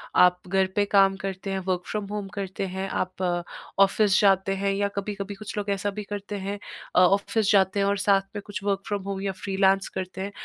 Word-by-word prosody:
आप 180 0 +5
घर 190 +1 +2
पे 205 - +3
काम 195 -1 +5
करते 195 0 -5
हैं, 190 - -1
वर्क़ 180 -1 0
फ़्रॉम 210 -1 -2
होम 205 -2 -3
करते 195 0 -3
हैं, 190 +1 -4
आप 185 +1 -5 0.6
ऑफ़िस 200 0 +4
जाते 195 -1 +3
हैं 200 0 +1
या 200 +1 +1
कभी-कभी 200 0 -4
कुछ 215 +1 -8
लोग 205 0 -2
ऐसा 200 +1 0
भी - - -3
करते 205 0 -5
हैं 200 +1 -3 0.4
अ, - - +6
ऑफ़िस 200 +3 +3
जाते 195 0 +3
हैं 200 - +3
और 200 - +1
साथ 195 0 +3
में 205 - -3
कुछ 205 -1 -6
वर्क़ 200 -1 +1
फ़्रॉम 205 -2 -2
होम 195 -1 -4
या 195 -1 -1
फ्रीलांस 195 0 +2
करते 190 0 -5
हैं। 200 +1 -4
195 Hz, 220 wpm, -26 LUFS, 190-205 Hz, 0.6 s, अ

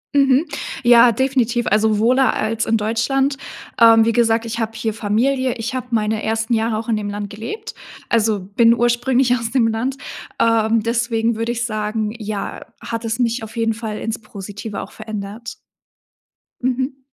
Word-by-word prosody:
Mhm. 275 +2 +4 0.4
Ja, 240 0 +7
definitiv. 245 -1 0
Also 215 0 +2
wohler 255 +5 +3
als 225 +1 -1
in 225 - +1
Deutschland. 265 +6 0 0.4
Ähm, 225 -1 +7
wie 230 - +3
gesagt, 230 0 +2
ich 230 +1 -4
habe 225 0 -2
hier 225 -1 -2
Familie. 250 +5 0
Ich 235 +3 -5
habe 255 -1 -4
meine 220 -1 0
ersten 225 +1 -1
Jahre 225 -1 +1
auch 225 +1 -5
in 220 - +2
dem 205 -1 -3
Land 205 0 -5
gelebt, 415 - -7 0.3
also 220 -3 +2
bin 230 +5 +3
ursprünglich 245 +2 +2
aus 230 0 -4
dem 245 -4 +3
Land. 235 +4 -1 0.4
Ähm, 225 -1 +3
deswegen 230 -1 0
würde 230 +1 -1
ich 235 0 -2
sagen, 215 -1 -2
ja, 210 -2 -4 0.2
hat 230 0 -5
es 225 +2 -2
mich 235 0 0
auf 220 +1 -9
jeden 225 -1 +1
Fall 220 -1 -5
ins 225 0 -3
Positive 205 0 -7
auch - - -9
verändert. 215 +1 -7 1.1
Mhm. 260 +2 -1
225 Hz, 170 wpm, -20 LUFS, 220-240 Hz, 1.1 s, Ja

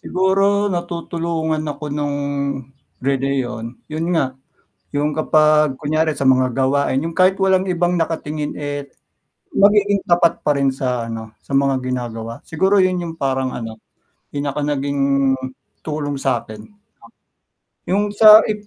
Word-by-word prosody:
siguro 195 +2 +1
natutulungan 170 -2 -2
ako 145 +1 -6
nung 145 -1 -2 0.9
relihiyon. 130 -4 -2 0.2
Yun 160 +2 -2
nga, 135 -5 0 0.6
yung 145 +1 -1
kapag 155 -3 +3
kunyari 155 +2 +1
sa 140 -3 -1
mga 130 -1 +4
gawain, 135 +1 +1
yung 165 +3 -4
kahit 185 +1 +3
walang 190 -1 +3
ibang 180 -1 0
nakatingin 155 -3 -2
eh, 145 -1 -5 0.6
magiging 205 0 +4
tapat 170 -1 +3
pa 150 - +1
rin 140 -1 +2
sa 125 -3 -2
ano, 110 -1 -8
sa - - -10
mga 135 -1 +1
ginagawa. 115 -3 -4
Siguro 190 +5 +2
yun 185 0 +2
yung 165 -1 -6
parang 130 -1 -1
ano, 115 -2 -6 0.6
do'n 145 0 -3
ako - - -2
naging 140 0 -1 0.8
tulong 150 -2 -3
sa'kin. 125 - -4 1.1
Yung 205 +2 +1
sa 215 +1 +8
if 210 -1 -5
150 Hz, 130 wpm, -19 LUFS, 135-175 Hz, 1.1 s, sa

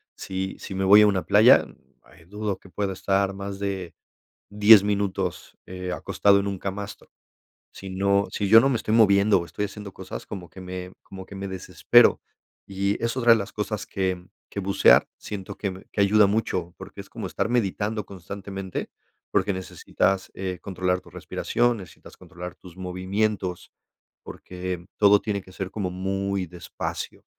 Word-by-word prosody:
sí 95 0 -4
sí - - -7
me 95 0 -1
voy 100 +2 +8
a - - +6
una 95 -3 +1
playa, - - +6 0.6
dudo 105 0 -3
que 95 - -17
pueda 100 +1 -2
estar 95 +1 0
más 100 0 -6
de 95 -4 -4 0.6
10 105 0 +7
minutos, 100 -2 -2
eh, 90 0 -6
acostado 100 +2 +2
en 100 - -2
un 100 -1 -3
camastro, 100 +2 -6 0.6
sí 95 -1 -9
no 100 +1 +1
sí 100 - -2
yo 110 +3 +9
no 135 - +3
me 130 - +1
estoy 110 -1 -1
moviendo 100 -3 +5
o - - -5
estoy 85 +5 -4
haciendo 105 0 -7
cosas, 95 0 -8
como 95 -4 -8
que 95 - -13
me 90 0 -7
como 95 -1 -10
que 100 - -11
me 95 0 -5
desespero, 95 -1 +4 0.4
y 100 +2 -2
es 115 +2 -1
otra 120 -2 +5
de 115 - +5
las 100 - -5
cosas 105 0 -3
que 95 -2 -2 0.2
que 100 - -5
bucear 100 0 +5
siento 95 -3 -7
que 100 -2 -3
me 95 +1 -12
que - - -2
ayuda 105 +1 +5
mucho, 95 -5 -1
porque - - -10
es - - -11
como - - -6
estar - - -2
meditando 105 -2 -1
constantemente, 95 0 -6 0.4
porque 100 +1 +1
necesitas, 95 +1 -1
eh, 95 -2 -4
controlar 90 -1 -1
tu - - -17
respiración, 120 -1 -1
necesitas 95 - -13
controlar 90 +1 -9
tus 90 -2 -15
movimientos, 95 +1 -2 0.5
porque 90 -1 -6
todo 105 -1 +6
tiene 100 -3 -3
que 95 - -16
ser 95 0 -5
como 95 -4 -3
muy 95 +1 -2
despacio, 85 -1 -6
100 Hz, 170 wpm, -25 LUFS, 95-105 Hz, 0.6 s, yo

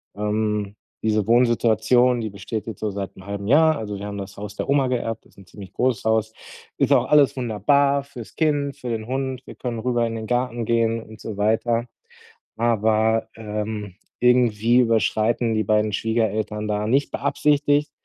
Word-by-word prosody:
Ähm, 105 -1 -1 0.3
diese 110 -2 +1
Wohnsituation, 120 +1 +3
die 110 - -3
besteht 105 +2 -6
jetzt 110 -4 -7
so 110 - -2
seit 100 -1 -5
1/2 100 +1 -6
Jahr. 155 +4 +5
Also, 105 -2 -5
wir 100 - -6
haben 100 0 -5
das 100 0 -8
Haus 105 0 -7
der - - -4
Oma 140 -2 +3
geerbt, 115 -3 -3
ist - - -25
'n 100 - -15
ziemlich 95 +1 -12
großes 125 -4 0
Haus. 110 0 +1 0.4
Ist - - +1
auch - - +4
alles 145 -2 +4
wunderbar 140 +4 +2
fürs 130 -5 -11
Kind, 145 -3 0
für 125 - -6
den 110 -2 -3
Hund. 130 0 -3
Wir - - -11
können 120 -2 -4
rüber 120 0 0
in 115 - -4
den 110 -1 -5
Garten 120 -1 -1
gehen 115 0 +1
und 110 0 -14
so 110 - -6
weiter. 115 +3 +1 0.7
Aber, 110 -1 +1
ähm, 105 -2 -5 0.2
irgendwie 120 -2 +3
überschreiten 115 0 +1
die 110 - +1
beiden 105 +1 +2
Schwiegereltern 110 -1 -1
da, 105 0 -1
nicht 135 +5 +1
beabsichtigt, 145 +1 +1
115 Hz, 175 wpm, -23 LUFS, 105-125 Hz, 0.7 s, Jahr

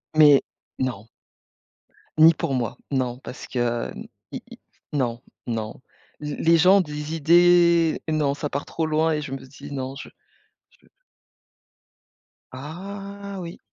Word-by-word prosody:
Mais 150 -3 +7 0.4
non. 120 -5 -3 1.1
Ni 160 +1 +8
pour 140 - -2
moi, 120 -3 -2
non 125 -2 -1
parce 125 - -9
que 120 -2 -1 0.4
i - - -5
i - - -11 0.3
non, 120 -4 -1 0.3
non, 110 0 -4 0.4
l 150 -1 -4
les 165 0 +5
gens 185 +4 +6
ont 195 - +5
des 150 0 -5
idées 170 +1 +5
non 150 -3 +1
ça 145 +1 -4
part 140 +1 -3
trop 165 - -2
loin 155 +1 +2
et 150 - -1
je 145 -3 -7
me 135 - -3
dis 135 +1 -12
non, 135 -1 -4
je - - -9 0.6
je - - -28 1.6
Ah 195 +8 -7
oui. 170 +1 -8
150 Hz, 140 wpm, -24 LUFS, 130-170 Hz, 1.6 s, Ni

